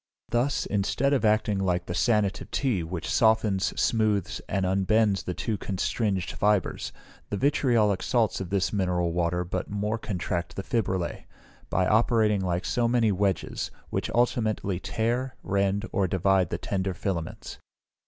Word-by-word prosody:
Thus, 125 Hz, +4 st, +1 dB
instead 105 Hz, +7 st, +1 dB
of 130 Hz, -5 st, +1 dB
acting 105 Hz, -2 st, +2 dB
like 90 Hz, -2 st, 0 dB
the 85 Hz, -, -4 dB
sanative 105 Hz, -1 st, +1 dB
tea, 125 Hz, -10 st, 0 dB
which 85 Hz, +1 st, -5 dB
softens, 110 Hz, -4 st, +3 dB
smoothes, 110 Hz, -4 st, +1 dB
and 95 Hz, -1 st, 0 dB
unbends 95 Hz, +1 st, +2 dB
the 90 Hz, -, -3 dB
two 110 Hz, -4 st, -2 dB
constringed 95 Hz, 0 st, -1 dB
fibres, 105 Hz, -2 st, 0 dB, 0.4 s
the 100 Hz, -, -2 dB
vitriolic 120 Hz, -7 st, +2 dB
salts 115 Hz, -5 st, +1 dB
of 95 Hz, -, -5 dB
this 95 Hz, +1 st, 0 dB
mineral 90 Hz, -4 st, 0 dB
water 90 Hz, +1 st, 0 dB
but 90 Hz, +1 st, -4 dB
more 105 Hz, +2 st, -2 dB
contract 85 Hz, -4 st, -3 dB
the 95 Hz, -, -4 dB
fibrillæ, 95 Hz, -8 st, -2 dB, 0.4 s
by 90 Hz, 0 st, +2 dB
operating 110 Hz, -1 st, +3 dB
like 90 Hz, -1 st, -1 dB
so 120 Hz, -3 st, +1 dB
many 115 Hz, -2 st, +3 dB
wedges, 100 Hz, 0 st, -1 dB, 0.2 s
which -, -, -1 dB
ultimately 110 Hz, -6 st, +1 dB
tear, 120 Hz, +6 st, -1 dB
rend, 100 Hz, +2 st, 0 dB
or 95 Hz, -2 st, +1 dB
divide 95 Hz, 0 st, +2 dB
the 85 Hz, -, -2 dB
tender 95 Hz, 0 st, -2 dB
filaments. 85 Hz, -3 st, -4 dB
100 Hz, 145 wpm, -27 LUFS, 95-110 Hz, 0.4 s, softens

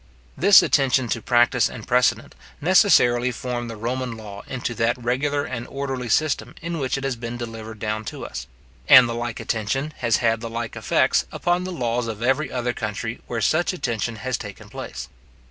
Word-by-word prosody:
This 200 Hz, +2 st, +7 dB
attention 130 Hz, -3 st, +2 dB
to 115 Hz, -, -1 dB
practice 120 Hz, +1 st, +3 dB
and 110 Hz, -, -9 dB
precedent, 125 Hz, -1 st, +2 dB, 0.3 s
necessarily 125 Hz, -, +4 dB
formed 120 Hz, -1 st, -4 dB
the 115 Hz, -, -6 dB
Roman 120 Hz, +2 st, -3 dB
law 100 Hz, -2 st, -9 dB
into 125 Hz, -2 st, -3 dB
that 115 Hz, +1 st, +1 dB
regular 135 Hz, +4 st, 0 dB
and 120 Hz, -2 st, -5 dB
orderly 135 Hz, -3 st, -4 dB
system 155 Hz, +5 st, 0 dB
in 170 Hz, 0 st, -4 dB
which 135 Hz, -1 st, -1 dB
it 135 Hz, -, -5 dB
has 135 Hz, -2 st, -1 dB
been 115 Hz, +1 st, -6 dB
delivered 110 Hz, -2 st, -7 dB
down 110 Hz, 0 st, -3 dB
to -, -, -6 dB
us; 60 Hz, -, -7 dB, 0.4 s
and 125 Hz, -2 st, +9 dB
the 115 Hz, -, -3 dB
like 120 Hz, -1 st, -4 dB
attention 135 Hz, +7 st, -2 dB
has 115 Hz, -2 st, +2 dB
had 115 Hz, -1 st, +1 dB
the 115 Hz, -, -5 dB
like 115 Hz, 0 st, -4 dB
effects -, -, +2 dB
upon 175 Hz, +1 st, 0 dB
the 185 Hz, -, -4 dB
laws 120 Hz, -6 st, -1 dB
of 110 Hz, 0 st, -5 dB
every 135 Hz, +3 st, +1 dB
other 125 Hz, -1 st, -1 dB
country 110 Hz, +1 st, -4 dB
where 115 Hz, -1 st, -3 dB
such 160 Hz, -, +2 dB
attention 115 Hz, -, -2 dB
has 125 Hz, +3 st, -3 dB
taken 105 Hz, -3 st, -9 dB
place. -, -, -7 dB
120 Hz, 185 wpm, -23 LUFS, 115-135 Hz, 0.4 s, and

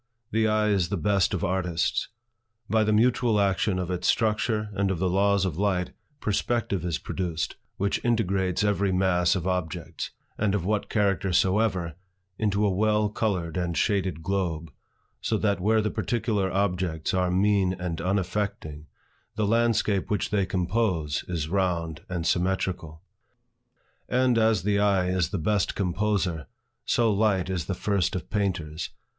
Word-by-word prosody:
The 110 Hz, 0 st, +2 dB
eye 105 Hz, 0 st, +2 dB
is 95 Hz, -4 st, +1 dB
the 100 Hz, -, -1 dB
best 100 Hz, 0 st, +2 dB
of -, -, -2 dB
artists. 90 Hz, -2 st, 0 dB, 0.6 s
By 110 Hz, 0 st, +3 dB
the 105 Hz, -, +1 dB
mutual 115 Hz, 0 st, +3 dB
action 100 Hz, 0 st, +1 dB
of 90 Hz, -1 st, -2 dB
its 90 Hz, 0 st, -1 dB
structure 110 Hz, -1 st, +1 dB
and 100 Hz, 0 st, 0 dB
of 95 Hz, -, -1 dB
the 95 Hz, +3 st, 0 dB
laws 100 Hz, 0 st, +3 dB
of 90 Hz, -2 st, -3 dB
light, 95 Hz, -3 st, 0 dB, 0.3 s
perspective 110 Hz, -3 st, -1 dB
is 85 Hz, -3 st, -1 dB
produced, 85 Hz, -4 st, -3 dB, 0.2 s
which 100 Hz, +1 st, -1 dB
integrates 95 Hz, -5 st, +1 dB
every 100 Hz, -1 st, +1 dB
mass 90 Hz, 0 st, +2 dB
of 90 Hz, -3 st, -3 dB
objects, 90 Hz, -4 st, -3 dB, 0.3 s
of 100 Hz, -4 st, 0 dB
what 105 Hz, +1 st, -1 dB
character 100 Hz, -3 st, +1 dB
soever, 95 Hz, -2 st, +1 dB, 0.5 s
into 105 Hz, -1 st, +1 dB
a 100 Hz, -, +2 dB
well 105 Hz, +2 st, +2 dB
colored 95 Hz, -6 st, -2 dB
and 85 Hz, -2 st, -1 dB
shaded 95 Hz, -6 st, 0 dB
globe, 85 Hz, -4 st, -2 dB, 0.5 s
so 110 Hz, -, 0 dB
that 100 Hz, -3 st, 0 dB
where 110 Hz, +3 st, +3 dB
the 105 Hz, -, -1 dB
particular 105 Hz, -5 st, -1 dB
objects 90 Hz, -5 st, -1 dB
are 90 Hz, -1 st, +1 dB
mean 95 Hz, 0 st, +2 dB
and 90 Hz, -3 st, -4 dB
unaffecting, 95 Hz, -5 st, -2 dB, 0.5 s
the 110 Hz, -1 st, 0 dB
landscape 110 Hz, -3 st, +1 dB
which 105 Hz, -3 st, -1 dB
they 100 Hz, -3 st, +1 dB
compose, 90 Hz, -5 st, 0 dB
is 85 Hz, -4 st, -2 dB
round 85 Hz, -3 st, -1 dB
and 85 Hz, -3 st, -3 dB
symmetrical. 90 Hz, -3 st, -1 dB, 1.1 s
And 125 Hz, -2 st, +3 dB
as 110 Hz, -4 st, +3 dB
the 100 Hz, 0 st, +2 dB
eye 100 Hz, -3 st, +2 dB
is 90 Hz, -3 st, +1 dB
the 100 Hz, -, -2 dB
best 100 Hz, +4 st, 0 dB
composer, 95 Hz, -3 st, -1 dB, 0.4 s
so 115 Hz, -3 st, +2 dB
light 100 Hz, -3 st, +1 dB
is 85 Hz, -4 st, -2 dB
the 95 Hz, -, -2 dB
first 100 Hz, -2 st, 0 dB
of 90 Hz, -, -5 dB
painters. 85 Hz, -7 st, -2 dB
95 Hz, 150 wpm, -26 LUFS, 90-105 Hz, 1.1 s, By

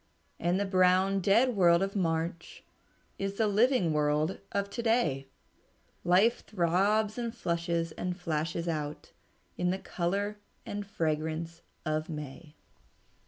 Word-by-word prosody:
And 175 Hz, +3 st, +1 dB
the 200 Hz, -, +1 dB
brown, 185 Hz, +1 st, +3 dB
dead 225 Hz, +6 st, +3 dB
world 175 Hz, -2 st, +5 dB
of 195 Hz, +1 st, -3 dB
March 170 Hz, -2 st, -2 dB, 0.6 s
Is 195 Hz, 0 st, -2 dB
the 220 Hz, -, +2 dB
living 210 Hz, -, +3 dB
world 150 Hz, +3 st, +1 dB
of 200 Hz, 0 st, -1 dB
to 235 Hz, -, -3 dB
day; 165 Hz, -, +1 dB, 0.8 s
Life 195 Hz, +7 st, +3 dB
throbs 205 Hz, +4 st, +1 dB
and 235 Hz, -1 st, -2 dB
flushes 170 Hz, -4 st, -1 dB
and 180 Hz, +3 st, -4 dB
flashes 165 Hz, 0 st, -2 dB
out 150 Hz, -2 st, -4 dB, 0.5 s
In 180 Hz, -, +1 dB
the 185 Hz, -, 0 dB
color 200 Hz, +4 st, -2 dB, 0.3 s
and 205 Hz, -1 st, -5 dB
fragrance 160 Hz, -1 st, -2 dB, 0.2 s
of 155 Hz, 0 st, -1 dB
May." 150 Hz, 0 st, -8 dB
180 Hz, 125 wpm, -30 LUFS, 165-200 Hz, 0.8 s, world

